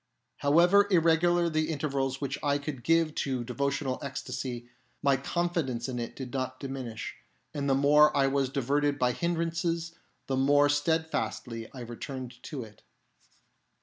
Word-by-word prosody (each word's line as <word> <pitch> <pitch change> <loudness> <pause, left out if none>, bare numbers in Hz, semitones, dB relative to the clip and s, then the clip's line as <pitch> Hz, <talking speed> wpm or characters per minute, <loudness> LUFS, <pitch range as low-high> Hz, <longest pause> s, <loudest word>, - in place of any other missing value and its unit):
However 175 +8 +5
irregular 170 0 +4
the 155 -1 0
intervals 135 -3 -1
which 140 -1 -3
I 145 -1 +2
could 140 -4 -6
give 165 -1 +3
to 130 -5 -2
devotional 140 +2 -2
ecstasy, 130 -3 -5 0.4
my 140 -1 +4
confidence 140 -4 -1
in 125 -2 -3
it 115 - -5
did 130 -3 -7
not 130 -1 -3
diminish; 130 -5 -6 0.4
and 140 -2 -2
the 135 - +4
more 145 +2 +5
I 135 - +4
was 135 -1 +1
diverted 140 +2 +1
by 125 -2 +2
hindrances, 170 +2 -1 0.3
the 135 - -1
more 145 +2 +4
steadfastly 145 -6 -1
I 130 - -9
returned 125 +1 -7
to 140 -3 -6
it. 105 -2 -15
140 Hz, 145 wpm, -29 LUFS, 130-160 Hz, 0.4 s, However